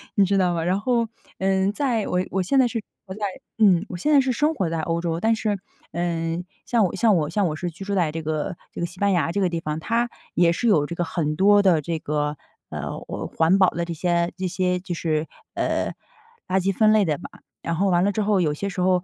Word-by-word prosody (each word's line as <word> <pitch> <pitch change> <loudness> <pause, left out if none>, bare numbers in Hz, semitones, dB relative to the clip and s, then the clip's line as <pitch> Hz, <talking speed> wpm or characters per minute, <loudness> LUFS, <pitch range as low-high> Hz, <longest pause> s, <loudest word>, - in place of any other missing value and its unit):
你 200 - +5
知 195 +1 +1
道 180 -2 +2
吧？ 165 - -1
然 180 +3 +1
后， 235 +1 +1 0.3
呃， 190 0 +2
在 235 -5 0
我 180 - 0
我 190 0 0
现 265 +9 +2
在 250 - +5
是 235 -1 -3
生 - - -10 0.2
活 190 - -7
在 210 - -3 0.3
嗯， 190 -3 +5
我 180 - -5
现 295 - -1
在 280 - +7
是 260 -1 0
生 300 +6 +1
活 190 - 0
在 165 -1 -2
欧 165 +1 -1
洲， 165 -1 -1
但 225 +4 +2
是， 210 -3 -1 0.3
呃， 165 0 -2 0.2
像 230 -4 +3
我 180 - -2
像 215 0 +4
我 150 -2 0
像 200 +3 +1
我 155 - -2
是 175 +3 -3
居 175 +4 -9
住 200 - -2
在 170 -5 +1
这 165 +1 -4
个， 155 +4 -2 0.2
这 - - -7
个 170 - 0
西 180 +1 -14
班 200 0 +3
牙 165 -2 +1
这 200 - 0
个 185 - +2
地 170 -1 -2
方， 155 -1 -3
它 235 +7 0 0.3
也 170 -1 +4
是 235 - -1
有 155 -9 +4
这 170 +3 -6
个 175 - 0
很 155 -3 -2
多 205 +4 +5
的 175 -6 +4
这 165 +2 -3
个， 150 0 -2 0.3
呃， - - -5
我 - - -4
环 165 +4 +3
保 185 - +6
的 170 - -2
这 170 - -4
些， 170 +1 0
这 185 - -2
些 180 0 0
就 180 -1 -5
是， 160 -1 -1 0.3
呃， - - 0 0.6
垃 190 +1 +2
圾 195 +1 +1
分 215 +2 +4
类 215 -1 +5
的 155 -4 0
吧。 - - -9 0.3
然 165 - -2
后 195 +4 +1
完 175 -1 +3
了 205 - +2
之 215 - 0
后， 205 -1 +2
有 155 -4 +1
些 200 +6 -3
时 185 - -6
候 180 -1 +2
180 Hz, 280 characters per minute, -23 LUFS, 165-200 Hz, 0.6 s, 在